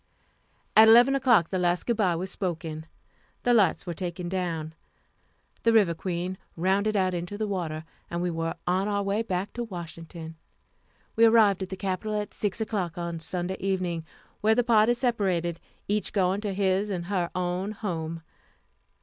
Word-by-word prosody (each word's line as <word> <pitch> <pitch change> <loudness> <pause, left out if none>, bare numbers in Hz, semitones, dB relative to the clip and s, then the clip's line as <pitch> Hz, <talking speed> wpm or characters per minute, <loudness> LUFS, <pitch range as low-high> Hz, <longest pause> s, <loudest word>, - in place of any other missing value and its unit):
At 220 +1 +9
11 240 +4 +7
o'clock 245 -11 +4
the 185 - -1
last 175 0 +1
good 235 - +1
by 185 -6 +2
was 185 +3 -3
spoken, 165 -4 -4 0.6
the 245 - +3
lights 200 -7 +3
were 175 - -3
taken 175 0 -4
down, 170 -4 -3 0.9
the 230 - +3
River 205 -7 +4
Queen 180 +2 -4 0.2
rounded 195 +5 +1
out 185 -1 +1
into 175 +3 -4
the 215 - -1
water 165 -6 -3 0.3
and 170 - -3
we 175 0 -1
were 165 0 -2
on 185 +3 +1
our 205 -1 0
way 200 +2 0
back 195 -3 -3
to 240 - -3
Washington. 165 -4 -8 0.8
We 230 - +6
arrived 220 -4 +5
at 190 - -3
the 190 - -5
Capital 205 +3 -2
at 210 - -5
6 205 0 -1
o'clock 200 -7 -2
on 170 -1 -3
Sunday 180 +3 -3
evening, 185 -4 -1 0.4
where 220 +1 +3
the 245 - +3
party 230 0 +4
separated, 190 -9 0 0.3
each 210 +1 -1
going 190 0 +1
to 205 -2 -2
his 195 +1 +1
and 180 -3 -3
her 180 -2 -1
own 180 +3 -1
home. 165 -6 -4
185 Hz, 170 wpm, -27 LUFS, 170-210 Hz, 0.9 s, At